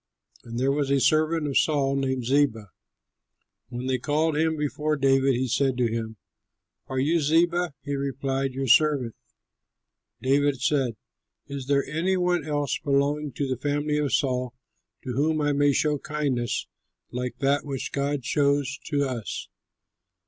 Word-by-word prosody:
And 115 Hz, 0 st, -7 dB
there 135 Hz, +2 st, +2 dB
was 140 Hz, -1 st, 0 dB
a 140 Hz, 0 st, +3 dB
servant 155 Hz, +3 st, +2 dB
of 140 Hz, -, +3 dB
Saul 140 Hz, -3 st, +1 dB
named 130 Hz, -2 st, -1 dB
Ziba. 115 Hz, -7 st, +1 dB, 1.0 s
When 120 Hz, +1 st, -5 dB
they 130 Hz, -1 st, 0 dB
called 155 Hz, +4 st, +1 dB
him 160 Hz, +1 st, +1 dB
before 150 Hz, +1 st, -1 dB
David, 135 Hz, -1 st, +3 dB
he 130 Hz, +2 st, 0 dB
said 130 Hz, +1 st, +1 dB
to 120 Hz, -2 st, +1 dB
him, 110 Hz, -1 st, -4 dB, 0.7 s
"Are 130 Hz, -, -4 dB
you 155 Hz, +6 st, +2 dB
Ziba?" 170 Hz, +1 st, +2 dB
He 145 Hz, -, -3 dB
replied, 135 Hz, -1 st, -2 dB
"Your 135 Hz, 0 st, -2 dB
servant." 135 Hz, -3 st, +3 dB, 1.1 s
David 140 Hz, 0 st, +2 dB
said, 130 Hz, -3 st, +1 dB, 0.5 s
"Is 140 Hz, -2 st, -6 dB
there 140 Hz, -1 st, +2 dB
any 170 Hz, +6 st, 0 dB
one 180 Hz, -2 st, +1 dB
else 145 Hz, -2 st, -1 dB
belonging 145 Hz, 0 st, 0 dB
to 140 Hz, +3 st, -2 dB
the 130 Hz, -1 st, -3 dB
family 145 Hz, +1 st, 0 dB
of 145 Hz, -3 st, 0 dB
Saul 125 Hz, -3 st, 0 dB, 0.5 s
to 130 Hz, -2 st, -4 dB
whom 155 Hz, +4 st, +1 dB
I 145 Hz, -1 st, +1 dB
may 145 Hz, 0 st, +3 dB
show 150 Hz, +1 st, +1 dB
kindness 135 Hz, -6 st, -2 dB, 0.5 s
like 125 Hz, -1 st, -4 dB
that 140 Hz, +2 st, +1 dB
which 135 Hz, -3 st, -4 dB
God 140 Hz, -2 st, -2 dB
shows 140 Hz, -2 st, +1 dB
to 145 Hz, -2 st, 0 dB
us?" 125 Hz, -6 st, -4 dB
140 Hz, 155 wpm, -26 LUFS, 130-150 Hz, 1.1 s, a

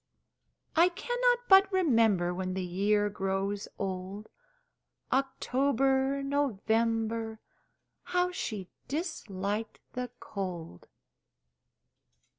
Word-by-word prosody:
I 340 Hz, +2 st, +6 dB
cannot 485 Hz, +5 st, +1 dB
but 385 Hz, 0 st, +7 dB
remember 225 Hz, -, +3 dB
When 185 Hz, 0 st, -3 dB
the 190 Hz, -1 st, -2 dB
year 205 Hz, +4 st, +2 dB
grows 195 Hz, 0 st, -2 dB
old 195 Hz, +2 st, -4 dB, 0.8 s
October 270 Hz, 0 st, +1 dB
November 225 Hz, -4 st, 0 dB, 0.7 s
How 360 Hz, 0 st, +1 dB
she 210 Hz, -, -4 dB, 0.2 s
disliked 220 Hz, -, -3 dB
the 250 Hz, 0 st, -3 dB
cold! 175 Hz, -, -6 dB
225 Hz, 80 wpm, -30 LUFS, 195-280 Hz, 0.8 s, but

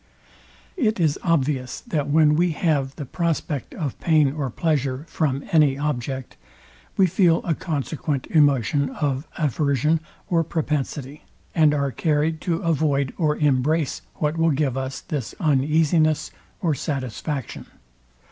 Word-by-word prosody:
It 220 Hz, -, +1 dB
is 155 Hz, -4 st, +2 dB
obvious, 140 Hz, -6 st, 0 dB
that 145 Hz, -3 st, -2 dB
when 150 Hz, 0 st, +5 dB
we 170 Hz, +2 st, +2 dB
have 145 Hz, -5 st, 0 dB
the 145 Hz, -, -6 dB
prospect 160 Hz, -3 st, -2 dB
of 150 Hz, -7 st, -4 dB
pain 155 Hz, -4 st, +3 dB
or 145 Hz, -3 st, -2 dB
pleasure 140 Hz, 0 st, -1 dB
from 140 Hz, -3 st, -1 dB
any 150 Hz, -4 st, +4 dB
object, 135 Hz, -2 st, -3 dB, 0.6 s
we 195 Hz, -, +6 dB
feel 175 Hz, -2 st, +3 dB
a 170 Hz, -, 0 dB
consequent 150 Hz, -3 st, -3 dB
emotion 140 Hz, -2 st, +3 dB
of 140 Hz, 0 st, -2 dB
aversion 150 Hz, +1 st, +1 dB, 0.3 s
or 165 Hz, -2 st, +2 dB
propensity, 150 Hz, -2 st, -3 dB, 0.3 s
and 155 Hz, -2 st, +5 dB
are 140 Hz, -1 st, 0 dB
carryed 155 Hz, +1 st, 0 dB
to 170 Hz, -2 st, -1 dB
avoid 145 Hz, -5 st, +1 dB
or 150 Hz, -3 st, +2 dB
embrace 150 Hz, +1 st, +1 dB
what 150 Hz, +1 st, -1 dB
will 165 Hz, 0 st, +3 dB
give 140 Hz, -3 st, 0 dB
us 135 Hz, 0 st, -4 dB
this 145 Hz, -9 st, -4 dB
uneasines 155 Hz, +1 st, +2 dB, 0.3 s
or 165 Hz, -5 st, +2 dB
satisfaction. 135 Hz, -, -4 dB
150 Hz, 130 wpm, -23 LUFS, 135-160 Hz, 0.6 s, we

